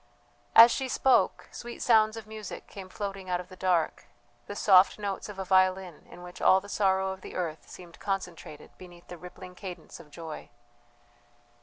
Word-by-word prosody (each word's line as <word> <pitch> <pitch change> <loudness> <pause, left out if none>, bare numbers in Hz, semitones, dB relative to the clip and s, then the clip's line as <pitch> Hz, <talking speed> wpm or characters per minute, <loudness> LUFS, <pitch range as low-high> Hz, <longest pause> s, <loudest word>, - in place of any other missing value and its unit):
As 230 +1 +10
she 265 -1 -2
spoke, 260 +1 +2
sweet 240 0 -9
sounds 220 -1 +3
of 225 - -8
music 215 -2 -8
came 190 -2 -11
floating 195 -1 -6
out 180 -1 0
of 180 - -9
the 185 - -12
dark 180 -3 0 0.4
the 205 - -6
soft 190 -2 +5
notes 205 -1 -5
of 205 - -9
a 190 - -4
violin 185 -2 +1
in 175 - -12
which 180 0 -11
all 190 - +5
the 200 - -13
sorrow 190 -2 +1
of 190 0 -8
the - - -10
earth 165 -3 -4
seemed 175 -2 -13
concentrated 180 -6 -6
beneath 175 -1 -14
the 175 - -8
rippling 180 +1 -11
cadence 180 -3 -9
of 150 - -15
joy. 160 0 -9
190 Hz, 180 wpm, -28 LUFS, 180-205 Hz, 0.4 s, As